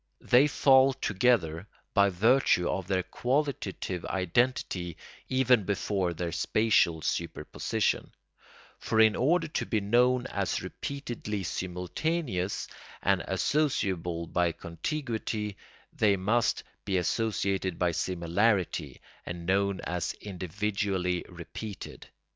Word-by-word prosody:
They 130 +4 +5
fall 135 -2 +5
together 100 -7 +1 0.3
by 100 0 +5
virtue 100 -2 +3
of 95 -3 -2
their 95 -1 +1
qualitative 120 - -2
identity 95 -3 0 0.3
even 130 -4 +4
before 95 -2 -1
their 85 0 -3
spatial 90 -6 +2
superposition; 85 - -1 0.7
for 110 - 0
in 110 -1 +6
order 165 +6 +2
to - - -2
be 110 - +1
known 125 +4 +3
as - - -2
repeatedly 120 -7 -5
simultaneous, 95 - -2 0.4
and - - +3
associable 95 - 0
by 85 -2 +2
contiguity, 110 - -3 0.4
they 100 -2 +3
must 110 +5 +1 0.2
be 95 -2 0
associated 95 -1 0
by 90 -1 +2
similarity 90 +4 0 0.2
and 85 -1 -6
known 100 +1 +1
as 90 -1 -2
individually 95 -1 -2
repeated. 90 +4 -8
100 Hz, 100 wpm, -29 LUFS, 90-120 Hz, 0.7 s, in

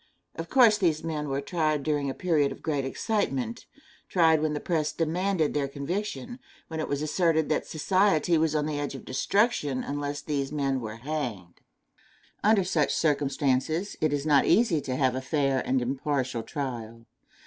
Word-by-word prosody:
Of 165 +1 -6
course 230 -5 +5
these 165 -5 +1
men 150 -3 -3
were 135 +1 -1
tried 155 -2 0
during 145 -2 0
a 135 - -4
period 155 -6 +1
of - - -10
great 145 -4 -1
excitement 135 - -2 0.4
tried 160 -3 +4
when 155 -1 0
the 150 - -2
press 155 -3 -1
demanded 170 0 0
their 145 -2 0
conviction 170 - -4 0.3
when 160 -1 -4
it 155 - -2
was 145 +1 -2
asserted 160 -1 +1
that 155 - 0
society 175 0 +2
was 160 -1 +2
on 150 -1 +1
the 150 -1 -2
edge 145 -1 -3
of 135 - -9
destruction 145 - +1
unless 145 0 -3
these 140 -2 -2
men 135 -3 -1
were 110 -1 -6
hanged. 120 - -5 0.8
Under 210 -2 +4
such 160 -5 +1
circumstances, 145 +3 0
it 155 -1 +2
is 145 0 -1
not 145 -3 +4
easy 195 -9 +3
to 130 -2 -3
have 130 -1 +2
a 130 - -3
fair 135 -1 +1
and 130 -1 +1
impartial 130 -1 -1
trial. 115 -3 -6
150 Hz, 170 wpm, -27 LUFS, 135-165 Hz, 0.8 s, course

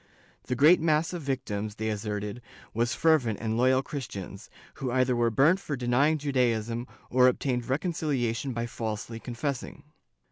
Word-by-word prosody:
The 125 - -1
great 150 +8 +6
mass 160 +1 +2
of 175 - -4
victims, 110 -7 -3
they 110 0 -2
asserted, 105 +1 -4 0.3
were 115 +2 +1
fervent 130 -6 +2
and 110 -1 -2
loyal 130 +2 +3
Christians, 105 -8 -7 0.3
who 130 - -1
either 130 0 +2
were 120 -1 +2
burnt 145 - +4
for 150 -6 -4
denying 130 +5 +2
Judaism 120 -4 0 0.2
or 125 0 +6
obtained 125 -1 0
reconciliation 140 -5 -1
by 115 -1 -2
falsely 115 0 -5
confessing. 125 +3 -4
125 Hz, 145 wpm, -28 LUFS, 115-140 Hz, 0.3 s, great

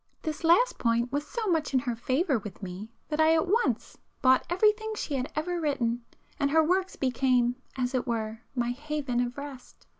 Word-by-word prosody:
This 310 +1 -4
last 360 +10 +4
point 235 +1 +1
was 290 +1 -2
so 465 -2 -3
much 325 -7 0
in - - +6
her 245 -3 -2
favour 265 +3 +1
with 210 -1 -9
me 190 +4 -6 0.2
that 310 0 +1
I 320 +1 +5
at 320 - +2
once 455 +6 0 0.2
bought 260 0 +5
everything 430 +4 +2
she 310 - -4
had 260 -1 -2
ever 345 +3 -1
written, 240 -6 0 0.4
and 280 -2 +2
her 320 +2 +4
works 370 +4 +1
became, 250 -2 +2 0.2
as 250 0 -1
it 255 0 -1
were, 225 -1 -2
my 240 -1 0
haven 285 -2 -2
of 245 +1 -1
rest. 280 -3 -9
275 Hz, 190 wpm, -28 LUFS, 245-320 Hz, 0.4 s, in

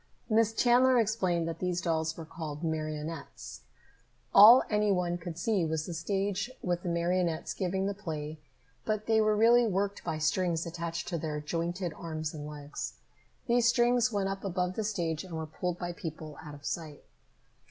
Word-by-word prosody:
Miss 225 0 +4
Chandler 250 +2 +4
explained 190 -7 +1
that 165 - -4
these 180 -1 -1
dolls 160 -2 -1
were 165 - -7
called 155 -1 -7
marionettes. 155 - -4 0.7
All 230 +5 +10
any 210 -1 +2
one 175 -2 0
could 165 -1 -7
see 210 -4 +1
was 160 -1 -1
the 175 - -5
stage 195 +6 -1
with 175 -1 0
the 175 - -3
marionettes 170 -1 0
giving 190 0 -1
the 200 - -1
play, 155 -6 -6 0.4
but 215 -1 -2
they 220 -1 +3
were 215 0 +3
really 235 +2 +5
worked 200 0 -1
by 155 - -2
strings 165 +1 0
attached 170 0 -4
to 170 - -2
their 150 -1 -3
jointed 170 +3 -3
arms 155 -2 -5
and 150 -1 -6
legs. 145 -1 -6 0.5
These 240 -1 +3
strings 240 0 +3
went 200 -2 0
up 195 0 -4
above 180 -1 -1
the 220 - -2
stage 170 -6 -2
and 180 -3 -8
were 160 0 -3
pulled 175 +3 -3
by 175 0 -4
people 160 -3 -7
out 150 -2 -8
of 145 0 -14
sight. 155 -4 -5
175 Hz, 175 wpm, -30 LUFS, 160-205 Hz, 0.7 s, All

